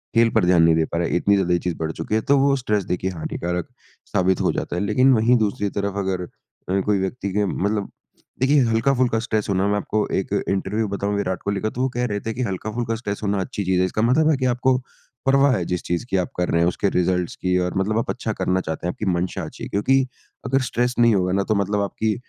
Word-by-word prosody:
खेल 115 Hz, 0 st, +5 dB
पर 110 Hz, -5 st, +4 dB
ध्यान 90 Hz, -2 st, +5 dB
नहीं 80 Hz, 0 st, +5 dB
दे 80 Hz, 0 st, +2 dB
पा 85 Hz, -, -4 dB
रहा 85 Hz, 0 st, 0 dB
है, -, -, -1 dB
इतनी 100 Hz, +3 st, +3 dB
ज़्यादा 90 Hz, -3 st, +1 dB
ये 85 Hz, -, +2 dB
चीज़ 90 Hz, -1 st, -3 dB
बढ़ 80 Hz, 0 st, -2 dB
चुकी 80 Hz, +6 st, -3 dB
है। 110 Hz, -, +2 dB
तो 140 Hz, +5 st, +3 dB
वो 140 Hz, 0 st, +3 dB
स्ट्रेस 105 Hz, -6 st, 0 dB
देखिए 90 Hz, +1 st, -2 dB
हानिकारक 90 Hz, +1 st, -3 dB, 0.4 s
साबित 95 Hz, 0 st, +1 dB
हो -, -, +2 dB
जाता -, -, -3 dB
है। 90 Hz, -, -1 dB
लेकिन 130 Hz, +6 st, +4 dB
वहीं 120 Hz, +1 st, +4 dB
दूसरी 105 Hz, -2 st, 0 dB
तरफ 100 Hz, 0 st, -3 dB
अगर 95 Hz, -2 st, -1 dB
अ, 95 Hz, +2 st, -6 dB
कोई 105 Hz, -2 st, +2 dB
व्यक्ति 100 Hz, +1 st, -3 dB
के 105 Hz, +1 st, +1 dB
मतलब 100 Hz, +2 st, -1 dB, 0.5 s
देखिए 135 Hz, +2 st, +4 dB
हल्का-फुल्का 120 Hz, +1 st, +2 dB
स्ट्रेस 110 Hz, -2 st, -1 dB
हो -, -, +2 dB
ना, 95 Hz, +2 st, +1 dB
मैं 105 Hz, 0 st, +1 dB
आपको 105 Hz, +1 st, -1 dB
एक 95 Hz, -, -1 dB, 0.2 s
इंटरव्यू 105 Hz, +3 st, -1 dB
बताऊँ 100 Hz, +1 st, -2 dB
विराट 95 Hz, -2 st, -2 dB
कोहली 100 Hz, -1 st, -2 dB
का, 110 Hz, -, 0 dB
तो 120 Hz, -, -5 dB
वो 130 Hz, -, +1 dB
कह 125 Hz, 0 st, -2 dB
रहे 105 Hz, -4 st, -2 dB
थे 110 Hz, +2 st, -4 dB
कि, 125 Hz, -, -4 dB
"हल्का-फुल्का 110 Hz, +3 st, -3 dB
स्ट्रेस 105 Hz, -3 st, -5 dB
होना 100 Hz, -1 st, 0 dB
अच्छी 100 Hz, +2 st, -4 dB
चीज़ 95 Hz, 0 st, +2 dB
है।" 90 Hz, -, +3 dB
इसका 100 Hz, +3 st, -2 dB
मतलब 135 Hz, +7 st, +3 dB
है 155 Hz, -, +4 dB
कि 130 Hz, -, -1 dB
आपको 125 Hz, +1 st, +2 dB, 0.5 s
परवाह 135 Hz, +1 st, +4 dB
है 90 Hz, -, -2 dB
जिस 90 Hz, 0 st, -2 dB
चीज़ 85 Hz, +6 st, -2 dB
की 95 Hz, -, +1 dB
आप 90 Hz, -, -1 dB
कर 90 Hz, -, 0 dB
रहे 85 Hz, -, +2 dB
हैं, 85 Hz, -, +3 dB
उसके 100 Hz, +3 st, 0 dB
रिज़ल्ट्स 90 Hz, -1 st, 0 dB
की, 90 Hz, 0 st, 0 dB
और 90 Hz, 0 st, -1 dB
मतलब 105 Hz, +3 st, 0 dB
आप -, -, -3 dB
अच्छा 115 Hz, -3 st, -2 dB
करना 95 Hz, -1 st, 0 dB
चाहते 80 Hz, +1 st, -4 dB
हैं, -, -, 0 dB
आपकी -, -, -5 dB
मंशा 90 Hz, +1 st, -2 dB
अच्छी -, -, -9 dB
है। -, -, -5 dB
क्योंकि 130 Hz, +6 st, +2 dB, 0.4 s
अगर 135 Hz, +1 st, +1 dB
स्ट्रेस 125 Hz, +1 st, 0 dB
नहीं 120 Hz, -1 st, +5 dB
होगा 90 Hz, -1 st, +1 dB
ना, 100 Hz, +1 st, +1 dB
तो 110 Hz, -, 0 dB
मतलब 100 Hz, +1 st, 0 dB
आपकी 105 Hz, +2 st, -1 dB
100 Hz, 260 wpm, -22 LUFS, 90-115 Hz, 0.5 s, खेल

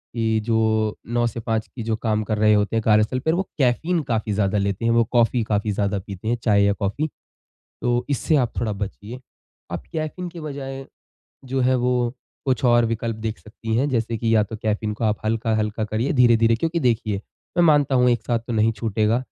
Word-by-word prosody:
कि 110 Hz, -1 st, +1 dB
जो 110 Hz, -2 st, +1 dB
9 120 Hz, 0 st, +1 dB
से 115 Hz, 0 st, -5 dB
5 110 Hz, -1 st, -2 dB
की 115 Hz, -, -8 dB
जो 110 Hz, -1 st, 0 dB
काम 110 Hz, -1 st, -1 dB
कर 110 Hz, 0 st, -2 dB
रहे 105 Hz, 0 st, +4 dB
होते 105 Hz, +1 st, +1 dB
हैं 115 Hz, -, +1 dB
कार्यस्थल 110 Hz, +4 st, +3 dB
पर 160 Hz, +4 st, 0 dB
वो 185 Hz, -, +1 dB
कैफीन 155 Hz, +7 st, +1 dB
काफ़ी 110 Hz, -4 st, -1 dB
ज़्यादा 100 Hz, 0 st, +1 dB
लेते 100 Hz, +3 st, -1 dB
हैं। 115 Hz, -, +3 dB
वो 115 Hz, 0 st, +4 dB
कॉफी 120 Hz, 0 st, +3 dB
काफ़ी 105 Hz, 0 st, 0 dB
ज़्यादा 100 Hz, 0 st, 0 dB
पीते 95 Hz, +2 st, -8 dB
हैं, 120 Hz, +1 st, +1 dB
चाय 100 Hz, -3 st, +4 dB
या 100 Hz, 0 st, +3 dB
कॉफी। 110 Hz, +10 st, -2 dB, 0.7 s
तो 120 Hz, 0 st, +1 dB
इससे 150 Hz, +3 st, +1 dB
आप 125 Hz, -5 st, +2 dB
थोड़ा 110 Hz, -2 st, -1 dB
बचिए। 105 Hz, +4 st, -6 dB, 0.5 s
आप 85 Hz, -, -4 dB
कैफीन 160 Hz, +3 st, -3 dB
के 170 Hz, 0 st, -10 dB
बजाय 135 Hz, -2 st, -6 dB, 0.6 s
जो 130 Hz, +1 st, -2 dB
है 130 Hz, +1 st, +3 dB
वो 125 Hz, -1 st, +1 dB, 0.3 s
कुछ 130 Hz, -1 st, 0 dB
और 120 Hz, -1 st, +5 dB
विकल्प 115 Hz, 0 st, -2 dB
देख 110 Hz, 0 st, -4 dB
सकती 110 Hz, +1 st, -6 dB
हैं, 135 Hz, +5 st, +2 dB
जैसे 115 Hz, -2 st, 0 dB
कि 115 Hz, 0 st, +1 dB
या 105 Hz, -, +5 dB
तो 110 Hz, +2 st, -7 dB
कैफीन 105 Hz, 0 st, -1 dB
को 115 Hz, -, -4 dB
आप 105 Hz, -1 st, +1 dB
हल्का-हल्का 110 Hz, -1 st, 0 dB
करिए 110 Hz, +5 st, -1 dB
धीरे-धीरे। 115 Hz, -3 st, +4 dB
क्योंकि 165 Hz, +6 st, -1 dB
देखिए, 115 Hz, -5 st, +1 dB, 0.4 s
मैं 175 Hz, -, +5 dB
मानता 145 Hz, -4 st, +4 dB
हूँ 125 Hz, 0 st, +4 dB
एक 120 Hz, -2 st, 0 dB
साथ 120 Hz, -2 st, +1 dB
तो -, -, -2 dB
नहीं 110 Hz, 0 st, +3 dB
छूटेगा, 110 Hz, +1 st, 0 dB
115 Hz, 210 wpm, -23 LUFS, 110-125 Hz, 0.7 s, और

